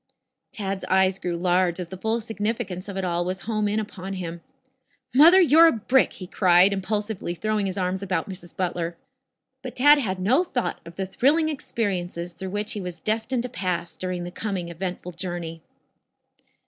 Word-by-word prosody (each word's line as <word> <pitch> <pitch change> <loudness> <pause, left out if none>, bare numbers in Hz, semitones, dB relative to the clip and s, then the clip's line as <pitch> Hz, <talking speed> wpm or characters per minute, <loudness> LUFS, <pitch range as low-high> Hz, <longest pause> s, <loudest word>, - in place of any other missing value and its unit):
Tad's 195 -5 -4
eyes 190 0 +2
grew 175 -2 -2
large 180 0 +1
as 175 -2 -5
the 190 - -7
full 220 +3 0
significance 215 -4 -3
of 200 -1 -6
it 190 - -1
all 175 -1 0
was 185 +2 -3
home 215 -1 -1
in 210 +1 0
upon 195 -2 -6
him. 170 -3 -5 0.7
"Mother, 330 +8 +8
you're 330 -1 +7
a - - +5
brick," 250 +4 +2
he 185 - -8
cried, 180 +1 +5
impulsively 205 -2 -2
throwing 215 +1 -1
his 185 - -4
arms 185 0 -1
about 185 -4 -2
Mrs. 180 -3 -9
Butler. 175 -2 -2 0.6
But - - -7
Tad 290 +3 +6
had 190 -8 -2
no 250 - +3
thought 250 -9 -3
of 170 - -11
the 190 - -2
thrilling 295 - +2
experiences 180 - -3
through 190 +2 -6
which 205 +2 -2
he 210 - -4
was 180 -2 -6
destined 225 +5 -1
to 250 - -4
pass 180 -5 -3
during 185 -1 -4
the 175 - -6
coming 190 -4 -3
eventful 180 +1 -5
journey. 170 -2 -5
190 Hz, 180 wpm, -24 LUFS, 180-220 Hz, 0.7 s, Mother